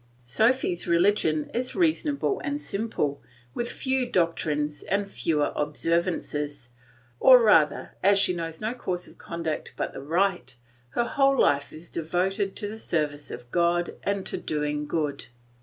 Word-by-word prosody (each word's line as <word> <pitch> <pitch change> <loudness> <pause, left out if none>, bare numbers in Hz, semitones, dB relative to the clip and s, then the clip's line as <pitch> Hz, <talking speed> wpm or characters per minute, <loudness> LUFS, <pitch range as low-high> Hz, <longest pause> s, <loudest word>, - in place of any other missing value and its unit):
Sophy's 180 - +1
religion 170 -3 +2
is 250 +2 -2
reasonable 320 +1 +1
and 290 -1 -2
simple, 195 - -2 0.3
with 240 0 -3
few 260 -2 -1
doctrines 155 -6 0
and 200 +1 -1
fewer 150 +3 0
observances; 150 -3 -1 0.5
or 255 -1 +9
rather 165 -10 +3
as 200 +1 +5
she 195 -2 +3
knows 165 -2 -5
no 220 +2 -2
course 180 -7 -4
of - - -17
conduct 165 -2 -4
but - - -2
the - - -7
right 165 -4 0 0.3
her 240 - 0
whole 275 0 +2
life 140 0 +3
is 160 +2 -12
devoted 185 +4 -1
to 205 - -4
the 220 +2 -7
service 150 -6 -1
of 120 0 -9
God 175 0 +1
and 200 -1 -1
to - - -1
doing 150 -1 -2
good. 150 -3 -2
170 Hz, 145 wpm, -26 LUFS, 150-215 Hz, 0.5 s, or